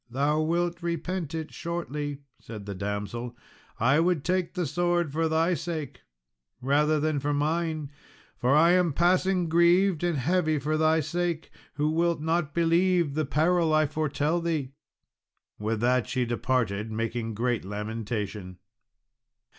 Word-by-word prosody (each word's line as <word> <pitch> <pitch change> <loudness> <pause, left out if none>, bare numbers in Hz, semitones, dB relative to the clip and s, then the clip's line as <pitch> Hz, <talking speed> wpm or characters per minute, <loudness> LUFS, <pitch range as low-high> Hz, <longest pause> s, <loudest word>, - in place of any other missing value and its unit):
"Thou 145 +5 +1
will 170 +2 0
repent 170 -1 -3
it 160 -1 -5
shortly," 150 -4 -4 0.2
said 105 -3 -9
the 100 - -5
damsel; 105 +5 -4 0.4
"I 135 +6 +4
would 170 -3 +1
take 185 0 -1
the 180 -2 0
sword 175 +1 0
for 160 +2 0
thy 165 +3 +2
sake 160 -1 -5 0.6
rather 150 +4 +2
than 155 -1 0
for 145 +1 -1
mine 155 0 -1 0.4
for 130 +3 +2
I 165 +3 +6
am 180 -4 +3
passing 180 +2 +2
grieved 170 +1 +3
and 175 -3 +1
heavy 155 +3 +1
for 150 +2 -1
thy 160 +1 +3
sake, 170 +1 -2 0.2
who 150 +1 +1
wilt 170 +1 +1
not 160 -1 -1
believe 170 -1 +2
the 155 +1 0
peril 160 +3 +2
I 155 0 +4
foretell 155 +2 -1
thee." 155 -6 -2 0.9
With 110 +1 -2
that 125 0 +2
she 125 -2 0
departed, 115 -3 -1
making 115 0 -3
great 120 +1 0
lamentation. 105 -2 -5
155 Hz, 140 wpm, -27 LUFS, 125-170 Hz, 0.9 s, I